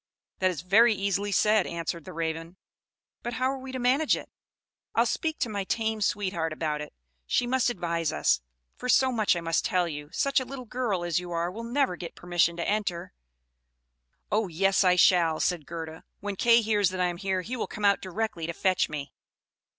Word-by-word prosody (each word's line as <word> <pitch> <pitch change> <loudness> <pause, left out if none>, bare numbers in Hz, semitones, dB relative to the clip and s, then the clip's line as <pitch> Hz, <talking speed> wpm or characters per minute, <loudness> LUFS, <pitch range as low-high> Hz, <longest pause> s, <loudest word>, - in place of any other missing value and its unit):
"That 185 - +3
is 175 -5 -4
very 215 +5 +5
easily 200 +1 -1
said," 210 0 +3
answered 170 -1 -4
the - - -8
Raven. 165 +2 -4 0.6
"But 240 - -4
how 255 +3 +1
are 270 - -5
we 260 0 -8
to 260 - -4
manage 260 +5 +3
it? - - -10 0.6
I'll - - +4
speak 315 -2 -1
to - - +2
my 205 -3 -3
tame 220 +2 -1
sweetheart 185 -6 0
about 155 -1 -2
it: 150 - -7 0.4
she 245 - +2
must 255 0 +2
advise 170 -6 -1
us; - - +2 0.3
for 250 - -6
so 260 +1 +5
much 215 -6 +2
I 170 - -3
must 165 0 0
tell 180 -1 +1
you, 150 -2 -6
such 275 0 +2
a - - -3
little 255 0 -8
girl 225 -7 -2
as 170 -2 0
you 180 0 -8
are 170 +1 -1
will 225 +5 -7
never 240 -4 0
get 170 - -7
permission 175 -1 +1
to 170 - -2
enter." 200 - -2 1.2
"Oh, 215 0 +2
yes 195 +4 +2
I 180 -1 +5
shall," 170 -3 +4
said 175 -5 -1
Gerda; 160 -1 -7 0.2
"when 205 0 -4
Kay 235 +4 +5
hears 210 -3 +2
that 185 0 -5
I 180 - +3
am 175 -1 -2
here, 190 0 -1
he 240 +7 -4
will 235 - -3
come 210 - -4
out 200 -1 +4
directly 185 -3 -3
to 170 - -3
fetch 185 +1 +1
me." 145 -2 -6
190 Hz, 205 wpm, -27 LUFS, 170-225 Hz, 1.2 s, very